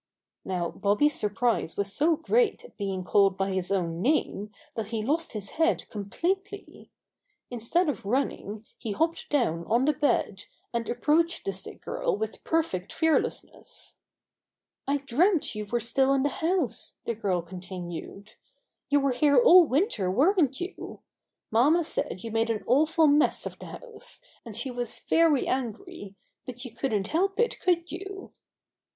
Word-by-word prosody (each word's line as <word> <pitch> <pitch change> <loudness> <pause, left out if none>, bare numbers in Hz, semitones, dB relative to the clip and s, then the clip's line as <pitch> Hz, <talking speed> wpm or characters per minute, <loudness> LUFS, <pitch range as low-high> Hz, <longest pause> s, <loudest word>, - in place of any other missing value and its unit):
Now 180 -3 -2
Bobby's 210 +10 +2
surprise 210 -4 0
was 200 -1 -1
so 320 +6 +3
great 450 +9 +1
at - - -16
being 195 -3 -3
called 195 0 +3
by 195 0 0
his 185 0 -2
own 170 -3 -1
name 215 -6 0 0.2
that 225 -5 -4
he 220 -1 -3
lost 310 +8 0
his 205 -3 -5
head 330 +1 +1
completely. 380 - -4 0.6
Instead 245 +10 0
of 295 - -2
running, 220 -2 -2
he 215 - -3
hopped 325 +7 -1
down 225 - +1
on 235 +9 +2
the 300 - +3
bed, 275 -9 0 0.3
and 235 -1 -2
approached 320 +7 +1
the 195 - -1
sick 190 - -7
girl - - -1
with 220 +1 -5
perfect 260 - -1
fearlessness. 320 -1 -2 0.9
"I 280 +1 +2
dreamt 290 - +1
you 210 -1 -5
were 240 +3 0
still 265 +4 +2
in 265 - +1
the 290 - +2
house," 330 - -1
the 235 - -1
girl 190 -5 -1
continued. 180 +3 -8 0.6
"You 285 0 +4
were 275 -1 +2
here 285 +3 +3
all 370 -8 +8
win 295 +11 +2
ter, 195 - -2
weren't 290 - +3
you? 365 +2 -7 0.5
Mamma 290 +10 +4
said 245 - -3
you 230 - -5
made 225 +1 +1
an 220 -2 -1
awful 315 +6 +3
mess 295 0 +3
of - - -7
the - - -9
house, 455 -4 -7 0.2
and 225 -3 -7
she 250 +3 -2
was 245 -2 -5
very 325 -5 +2
angry, 255 - -4 0.3
but 250 +1 -7
you 250 - -7
couldn't 220 -5 -1
help 390 +6 0
it, 470 - +1
could 345 -1 +1
you?" 390 +2 -8
250 Hz, 160 wpm, -27 LUFS, 205-325 Hz, 0.9 s, all